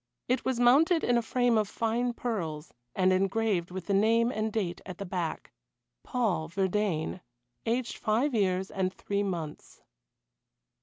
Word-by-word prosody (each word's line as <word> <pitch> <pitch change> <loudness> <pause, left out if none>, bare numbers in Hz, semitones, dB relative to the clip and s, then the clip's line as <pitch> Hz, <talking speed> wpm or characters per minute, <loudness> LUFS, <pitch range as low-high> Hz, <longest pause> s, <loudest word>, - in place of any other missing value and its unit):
It 255 +2 +1
was 260 -2 -1
mounted 305 +8 +5
in 245 - +3
a 235 - +3
frame 240 0 +2
of 210 -2 -1
fine 235 +2 0
pearls, 175 -11 -4 0.2
and 185 0 +3
engraved 195 -1 +1
with 185 +1 -6
the 200 - 0
name 230 +4 +3
and 215 -1 -1
date 190 -6 -2
at 185 -2 -8
the 200 - -5
back: 175 -3 -4 0.5
"Paul 195 -11 -1
Verdayne 190 -2 -1 0.5
aged 235 +1 -1
five 240 +7 +1
years 190 -3 +1
and 185 -1 0
three 200 +1 -2
months." 170 -6 -5
205 Hz, 150 wpm, -29 LUFS, 185-235 Hz, 0.5 s, mounted